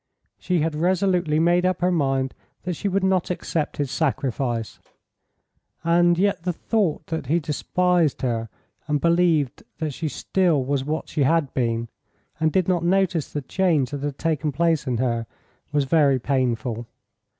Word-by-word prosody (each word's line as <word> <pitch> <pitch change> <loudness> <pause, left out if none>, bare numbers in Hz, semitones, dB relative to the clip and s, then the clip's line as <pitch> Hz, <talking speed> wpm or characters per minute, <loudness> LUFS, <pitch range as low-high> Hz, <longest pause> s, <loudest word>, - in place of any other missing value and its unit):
She 180 -3 0
had 160 0 0
resolutely 175 -1 +1
made 175 +2 +3
up 185 -1 0
her 180 +1 +3
mind 135 -5 0 0.3
that 180 - -2
she 200 - -3
would 195 0 0
not 190 -2 +1
accept 165 -3 -2
his 140 -3 -2
sacrifice, 130 -6 -1 1.0
and 175 +1 +4
yet 200 -1 +1
the 180 +1 -1
thought 175 -5 -1
that 160 -5 -4
he 165 +5 +2
despised 170 +1 0
her 115 -3 -1 0.4
and 150 -1 +1
believed 170 -4 +2 0.2
that 155 -3 -3
she 160 +4 -3
still 165 -5 +1
was 140 0 0
what 155 +3 -3
she 150 - -2
had 150 0 +2
been, 115 -2 -1 0.5
and 160 0 +2
did 185 +2 +1
not 180 -2 +1
notice 180 -3 +1
the 145 - -4
change 155 -4 +1
that 145 -1 -4
had 145 -1 -3
taken 155 -2 -1
place 165 0 +1
in 125 -2 0
her, 115 -2 -1 0.4
was 145 -1 +2
very 140 -1 +3
painful. 120 -3 -1
155 Hz, 160 wpm, -23 LUFS, 135-175 Hz, 1.0 s, and